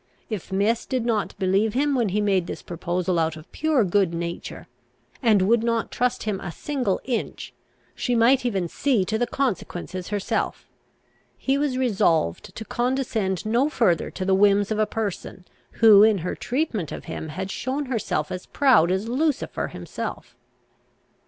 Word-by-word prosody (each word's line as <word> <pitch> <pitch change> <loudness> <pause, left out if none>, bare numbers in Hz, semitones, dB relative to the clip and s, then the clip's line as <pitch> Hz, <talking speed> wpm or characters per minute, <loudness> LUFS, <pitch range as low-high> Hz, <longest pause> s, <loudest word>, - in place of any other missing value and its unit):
If 200 -3 -5
Miss 210 +4 +1
did 255 -3 -1
not 225 -3 -1
believe 195 +4 +1
him, 285 +2 +2
when 240 -6 +1
he 210 +3 0
made 195 -4 +1
this - - -6
proposal 175 0 -1
out 160 -1 0
of 155 - -14
pure 305 -5 +2
good 185 -2 +1
nature, 170 0 -5 0.6
and 215 -6 +4
would 225 +4 +3
not 230 -1 0
trust 250 0 0
him 210 -3 -2
a 175 - -6
single 255 - -2
inch, 235 - -4 0.4
she 245 - -1
might 245 +3 +4
even 195 -8 -1
see 235 0 +1
to 220 +3 -1
the 245 - +1
consequences 185 -8 -3
herself. 205 -1 -2 0.7
He 270 - 0
was 280 -2 0
resolved 195 - +1
to 220 - -6
condescend 240 -8 -1
no 240 +7 +2
further 205 - +1
to 185 - -5
the 190 - +2
whims 200 +1 +4
of 215 - 0
a 215 - +2
person 200 -4 -4 0.3
who, 215 -3 +7
in 215 -1 +5
her - - -1
treatment 245 - -2
of - - -7
him, 160 - -6
had 190 +5 -5
shown 270 +6 -2
herself 220 - -2
as 180 - -6
proud 250 - +4
as 190 +4 -1
Lucifer 285 +4 -1
himself. - - -7
215 Hz, 165 wpm, -24 LUFS, 185-245 Hz, 0.7 s, who